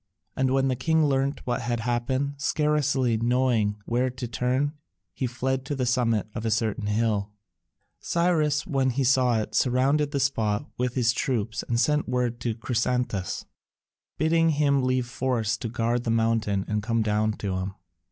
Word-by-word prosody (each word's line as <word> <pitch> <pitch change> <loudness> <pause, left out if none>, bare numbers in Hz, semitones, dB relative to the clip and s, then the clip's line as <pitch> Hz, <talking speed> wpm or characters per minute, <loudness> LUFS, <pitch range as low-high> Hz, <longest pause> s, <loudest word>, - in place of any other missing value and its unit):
And 130 0 +1
when 135 +1 +2
the 130 - +1
king 160 +5 +2
learnt 135 0 0
what 120 0 -1
had 120 -1 -2
happened, 125 +4 -1
scarcely 140 -5 +1
knowing 115 -3 +1
where 125 +2 +1
to 125 -1 -6
turn, 130 +5 0 0.4
he 130 - -2
fled 130 +2 -2
to 145 - -3
the 130 -2 -1
summit 120 -4 +1
of 110 - -5
a 115 - 0
certain 110 -1 0
hill. 105 -1 0 0.7
Cyrus, 155 -4 +1
when 135 -2 +1
he 130 +2 0
saw 125 -2 +3
it, 110 0 -4
surrounded 135 +5 +2
the 140 - -2
spot 115 -4 0
with 125 0 -2
his 120 -2 +2
troops 115 -5 -1
and 115 -1 -1
sent 150 +2 +1
word 125 -2 -1
to 115 -2 -2
Chrysantas, 120 -4 -1 0.7
bidding 165 +2 +3
him 145 -2 +2
leave 130 -1 +1
a - - -14
force 125 -4 -1
to 115 - -4
guard 120 +1 0
the 115 - -2
mountains 115 -3 +1
and 105 0 -1
come 115 +1 0
down 110 0 +1
to 100 -3 -3
him. 95 +1 -4
125 Hz, 170 wpm, -26 LUFS, 115-135 Hz, 0.7 s, saw